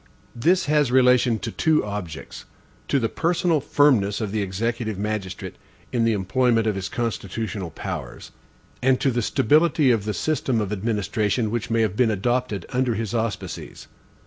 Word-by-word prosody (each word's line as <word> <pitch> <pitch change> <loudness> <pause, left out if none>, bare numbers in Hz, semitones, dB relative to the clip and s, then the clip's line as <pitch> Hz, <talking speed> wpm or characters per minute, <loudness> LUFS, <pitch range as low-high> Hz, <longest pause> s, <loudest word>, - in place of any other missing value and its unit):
This 175 +10 +2
has 150 -3 +2
relation 125 -2 +4
to 100 - -5
two 155 -7 +2
objects: 100 -6 -6 0.4
to - - +2
the 115 - +1
personal 170 +4 +1
firmness 130 -8 +3
of 105 -4 -3
the 110 0 -1
executive 110 +2 -2
magistrate, 105 -2 -4 0.3
in 120 -2 +1
the 115 - +3
employment 115 +4 +1
of 110 - +1
his 95 -1 -4
constitutional 110 -4 -3
powers; - - -7 0.5
and 130 0 +3
to 135 - +2
the 120 0 0
stability 150 +5 +3
of 110 -4 0
the 105 - -2
system 140 -6 0
of 105 -2 -2
administration 105 +1 -1
which 120 -1 -2
may 115 0 +2
have 105 -3 -1
been 120 0 +3
adopted 110 -1 -1
under 125 -2 0
his 110 -1 -3
auspices. 110 -3 -4
115 Hz, 160 wpm, -23 LUFS, 105-130 Hz, 0.5 s, relation